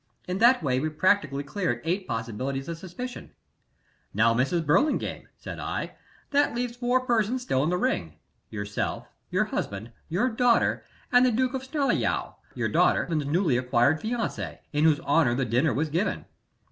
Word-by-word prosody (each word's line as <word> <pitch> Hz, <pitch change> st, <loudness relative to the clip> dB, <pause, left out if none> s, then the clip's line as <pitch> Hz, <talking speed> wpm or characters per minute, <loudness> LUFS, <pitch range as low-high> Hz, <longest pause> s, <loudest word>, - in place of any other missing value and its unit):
In 180 Hz, +1 st, -2 dB
that 240 Hz, -3 st, +5 dB
way 130 Hz, -3 st, +1 dB
we 155 Hz, +3 st, -1 dB
practically 155 Hz, -4 st, +1 dB
cleared 140 Hz, -3 st, -2 dB
eight 185 Hz, +3 st, -1 dB
possibilities 125 Hz, +4 st, -3 dB
of 165 Hz, -1 st, -5 dB
suspicion. 215 Hz, +8 st, -7 dB, 0.8 s
"'Now, 115 Hz, +2 st, +4 dB
Mrs. 140 Hz, +8 st, +1 dB
Burlingame,' 215 Hz, -, +1 dB
said -, -, -8 dB
I, -, -, -3 dB, 0.4 s
'that 285 Hz, -4 st, +2 dB
leaves 240 Hz, 0 st, -2 dB
four 245 Hz, +1 st, +1 dB
persons 240 Hz, 0 st, 0 dB
still 135 Hz, -, +1 dB
in 155 Hz, -, +1 dB
the 180 Hz, -, +1 dB
ring 85 Hz, -, -1 dB, 0.4 s
yourself, 100 Hz, -2 st, -3 dB, 0.2 s
your -, -, +1 dB
husband, 105 Hz, +4 st, -4 dB, 0.2 s
your 185 Hz, +10 st, +1 dB
daughter, 245 Hz, -1 st, +2 dB, 0.3 s
and 245 Hz, 0 st, +6 dB
the 255 Hz, -, +4 dB
Duke 255 Hz, +3 st, +1 dB
of 265 Hz, -, -2 dB
Snarleyow, 280 Hz, +1 st, 0 dB, 0.2 s
your -, -, -1 dB
daughter's -, -, +2 dB, 0.2 s
newly 160 Hz, -4 st, +2 dB
acquired 125 Hz, +4 st, +2 dB
fiancé, 230 Hz, +1 st, -3 dB, 0.2 s
in 150 Hz, +2 st, +2 dB
whose 155 Hz, -2 st, +4 dB
honor 140 Hz, -5 st, +3 dB
the 135 Hz, 0 st, 0 dB
dinner 125 Hz, +7 st, +2 dB
was 150 Hz, +7 st, -1 dB
given. 175 Hz, +8 st, -1 dB
165 Hz, 160 wpm, -26 LUFS, -, 0.8 s, and